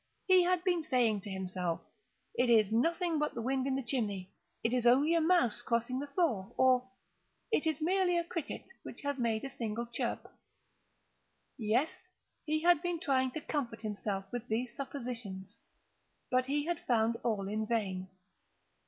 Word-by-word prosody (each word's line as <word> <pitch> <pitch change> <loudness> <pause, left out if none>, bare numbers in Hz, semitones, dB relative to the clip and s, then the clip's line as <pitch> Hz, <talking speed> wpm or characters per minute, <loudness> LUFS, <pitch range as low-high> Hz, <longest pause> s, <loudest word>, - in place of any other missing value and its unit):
He 370 -1 +6
had 360 0 +2
been 355 -3 +2
saying 240 -8 +2
to 205 - -8
himself—"It 185 +5 -4
is 220 -3 +5
nothing 335 +6 +2
but 300 0 -1
the 235 - -3
wind 265 +1 0
in 265 - +1
the 270 - -2
chimney—it 220 -1 -3
is 245 -1 +2
only 280 +7 +5
a 335 - +3
mouse 335 -9 +3
crossing 235 +2 0
the 285 - -4
floor," 280 - 0
or 255 -1 +4 0.6
"It 325 -7 +2
is 315 -2 0
merely 355 +2 +2
a 340 - +1
cricket 335 -3 -5 0.2
which - - -9
has 285 -1 -2
made 225 -2 0
a 275 - -4
single 230 -2 -3
chirp." 235 0 -3 1.3
Yes, 245 +6 +1 0.5
he 310 0 0
had 345 -3 +5
been 350 -2 -1
trying 260 -4 +2
to 315 - -4
comfort 255 -7 -3
himself 205 -2 -3
with 245 0 -4
these 235 +2 -2
suppositions: 240 -8 -6 0.7
but 255 0 +3
he 290 +1 0
had 345 -1 -2
found 230 -1 +2
all 210 -5 0
in 215 +1 -2
vain. 190 -5 -1
250 Hz, 160 wpm, -33 LUFS, 220-310 Hz, 1.3 s, He